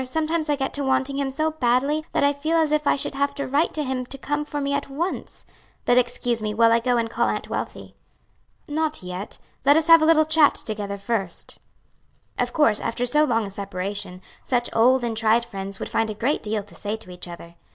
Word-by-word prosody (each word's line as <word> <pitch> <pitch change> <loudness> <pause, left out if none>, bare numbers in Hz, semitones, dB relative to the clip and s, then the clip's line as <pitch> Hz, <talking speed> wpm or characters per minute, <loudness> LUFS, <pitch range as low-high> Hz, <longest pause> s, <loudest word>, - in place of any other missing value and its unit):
sometimes 315 +4 -1
I 295 - +3
get 270 -1 -3
to 285 - -2
wanting 265 +1 0
him 275 -1 0
so 310 +4 -1
badly 275 +2 +1
that - - +1
I 285 0 +4
feel 310 +4 0
as 315 -2 +2
if 300 -1 +1
I - - +4
should - - -3
have 280 +1 -1
to 280 - -3
write 290 +5 +1
to 305 - -1
him 260 -2 -2
to 275 - -8
come 290 +2 -2
for 295 0 -5
me 280 0 -1
at 280 0 -2
once. 330 +7 -4 0.4
But 245 +1 +5
excuse 240 -1 -1
me 210 -1 -2
while 230 +1 +5
I 230 - +4
go 245 +1 +1
and 230 -1 0
call - - 0
Aunt - - -3
Wealthy." - - -5 0.7
"Not 310 -4 -1
yet; 180 +3 -5 0.3
let 285 +3 +6
us 320 - +2
have 330 0 +8
a - - +4
little 315 -1 +5
chat 315 -1 +4
together 205 -2 -4
first." 200 -3 -4 0.8
Of - - 0
course, 230 -9 +3
after 240 +2 -2
so 300 +5 +3
long 230 -5 +1
a 195 - -7
separation, 195 -1 -5 0.2
such 245 -2 0
old 250 +3 +4
and 230 -2 -2
tried 225 +1 +3
friends 195 -2 -6
would - - -4
find 225 -1 0
a 215 - -4
great 250 +8 0
deal 215 -1 -2
to 205 - -16
say 205 +1 -4
to 220 -4 -10
each 180 0 -7
other. 170 -1 -10
255 Hz, 230 wpm, -23 LUFS, 220-295 Hz, 0.8 s, have